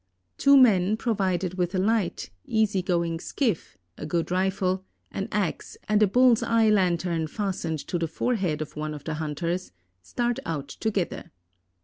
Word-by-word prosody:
Two 280 0 +6
men, 210 -5 +5
provided 190 -5 -1
with 180 +1 0
a - - +1
light, 195 - 0 0.2
easy 215 -3 +1
going 170 -2 -1
skiff, 220 - -2 0.2
a - - -5
good 170 +2 -1
rifle, 185 0 0 0.3
an 195 - -3
ax, 205 -5 -2
and 215 0 +2
a 210 - +6
bull's 245 +2 +4
eye 225 -2 +3
lantern 175 -4 +1
fastened 180 -4 -3
to 175 - -2
the 165 - -1
forehead 170 -4 -1
of 150 - -13
one 155 0 -4
of 145 - -10
the 160 - -3
hunters, 170 +4 -3 0.3
start 240 - -2
out 145 -4 -4
together. 200 +3 -3
185 Hz, 155 wpm, -26 LUFS, 165-215 Hz, 0.3 s, Two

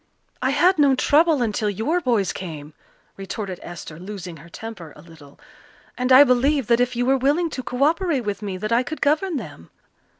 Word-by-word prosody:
"I - - +1
had 365 -1 +3
no 280 -2 +5
trouble 300 0 +3
until 215 -1 -1
your 225 - -1
boys 230 - 0
came," 155 -4 -8 0.4
retorted 195 -1 -6
Esther, 165 -2 -9
losing 185 -3 -8
her 160 +4 -15
temper 190 -6 -9
a - - -14
little, 155 -4 -16 0.6
"and 250 +1 -1
I 260 +2 +10
believe 270 +1 +2
that 235 0 +4
if 245 0 0
you 245 +1 0
were 270 +1 +3
willing 300 +6 +1
to 260 - -4
co 250 +1 -2
operate 320 -3 +1
with 205 0 -3
me 195 -3 -4
that 215 +4 -4
I 235 +1 +4
could 295 +5 -6
govern 310 +4 +1
them." 145 - -9
240 Hz, 195 wpm, -22 LUFS, 185-285 Hz, 0.6 s, I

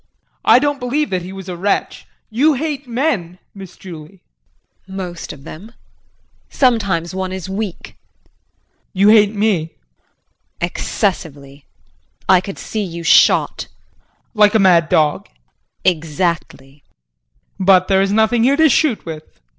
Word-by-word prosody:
JEAN. - - -48 0.2
I - - +7
don't 290 +1 0
believe 275 +3 -2
that 185 -1 -1
he 180 +2 -8
was 190 -1 -9
a 180 - -5
wretch. 195 +4 -2 0.2
You 285 +7 +3
hate 285 -1 -4
men, 230 - -2 0.2
Miss 190 -3 -12
Julie. 175 0 -12 0.6
JULIE. 190 0 -9
Most 175 -3 -6
of 140 -2 -12
them. 205 +12 -11 0.8
Sometimes 200 - 0
one 190 0 -3
is 190 -1 -6
weak 195 -1 -5
JEAN. - - -12 1.0
You 195 +1 +3
hate 210 -1 +5
me? 210 -1 +2
JULIE. - - -29 0.8
Excessively. 150 -6 -3 0.6
I 185 -2 +5
could 195 +1 -8
see 215 - -4
you 170 -3 -7
shot - - +3
JEAN. - - -39 0.3
Like 210 -1 +4
a - - +7
mad 175 -5 +4
dog? 150 -2 +1
JULIE. 60 - -4
Exactly! 155 -3 -3 0.9
JEAN. 190 - -2
But 185 -1 +5
there 190 -1 +3
is 195 0 0
nothing 220 +2 +2
here 275 +3 +3
to 320 -1 +5
shoot 270 -3 +1
with. 155 -2 -10
190 Hz, 150 wpm, -17 LUFS, 170-220 Hz, 1.0 s, I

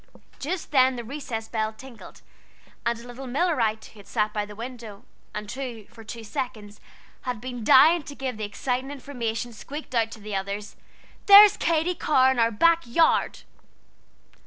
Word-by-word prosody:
Just 330 +3 -4
then 260 -2 +4
the 240 - -5
recess 230 -3 -6
bell 220 -1 -2
tinkled; 245 +1 -13 0.6
and 235 0 0
a 235 - -12
little 250 +2 -9
Millerite 245 -6 0
who 205 -2 -14
sat 210 0 -1
by 210 -1 -2
the 210 - -11
window, 230 -2 -9 0.3
and 210 0 -5
who, 240 -4 -6
for 225 +2 -15
two 230 +1 -8
seconds, 215 -2 -6 0.4
had 250 -3 -4
been 245 0 -6
dying 320 +9 +6
to 285 0 -10
give 260 -3 -4
the 215 - -5
exciting 250 +6 -3
information, 245 -4 -4
squeaked 285 +6 -9
out 225 -2 +2
to - - -11
the 210 -1 -6
others: 200 +2 -4 0.5
"There's 405 0 +10
Katy 330 +2 +1
Carr 265 -6 +3
in 260 - -1
our 230 0 +4
back 335 +10 +3
yard!" 320 +8 +2
240 Hz, 165 wpm, -25 LUFS, 220-270 Hz, 0.6 s, There's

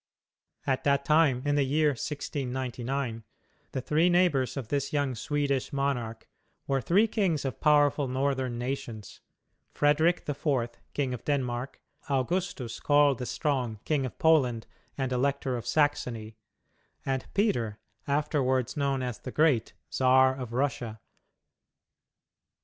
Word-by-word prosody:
At 135 -2 0
that 140 -1 +2
time 150 -5 +3
in 145 - +2
the 145 -1 +3
year 150 +3 +2
1699 130 -3 -3 0.5
the 130 - -3
three 155 +7 +2
neighbors 150 -8 +2
of 125 -5 -5
this 140 -1 -1
young 145 -3 0
Swedish 140 +2 -1
monarch 125 -5 -2 0.4
were 135 -1 0
three 195 - +3
kings 185 -10 0
of 130 -4 -4
powerful 145 -1 +4
northern 130 -1 -1
nations 120 -4 -5 0.5
Frederick 155 +4 +2
the 145 - -1
Fourth, 130 -5 -1 0.2
King 135 -3 0
of 125 - -6
Denmark; 130 -3 -2 0.3
Augustus, 140 - -1
called 145 -3 +4
the 125 - -4
Strong, 130 -8 -1
King 150 -3 +1
of - - -11
Poland 130 -8 +3 0.3
and 135 -2 -1
Elector 135 0 0
of 120 - -5
Saxony, 125 -7 0 0.7
and 135 -1 -2
Peter, 120 - +1 0.3
afterward 140 -3 0
known 140 -3 0
as 125 -3 -4
the 130 - -7
Great, 145 -7 +2 0.2
Czar 130 0 +4
of 125 -3 -6
Russia. 120 -3 -2
135 Hz, 130 wpm, -28 LUFS, 125-145 Hz, 0.7 s, powerful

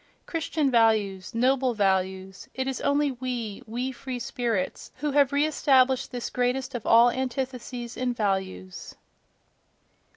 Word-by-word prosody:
—Christian 315 -4 -1
values—noble 230 +3 +2
values: 190 -1 -1
it 260 - -1
is 270 - -3
only 285 0 +2
we, 245 -5 -4
we 245 +4 -3
free 260 0 -6
spirits, 235 -6 -3
who 295 +2 -2
have 280 -1 +4
re 285 +1 +3
established 265 -4 +3
this 245 -2 -4
greatest 255 +2 -1
of 240 -3 -5
all 235 +1 +7
antitheses 250 -2 -4
in 255 -1 -1
values!... 190 - -3
245 Hz, 125 wpm, -26 LUFS, 220-265 Hz, -, all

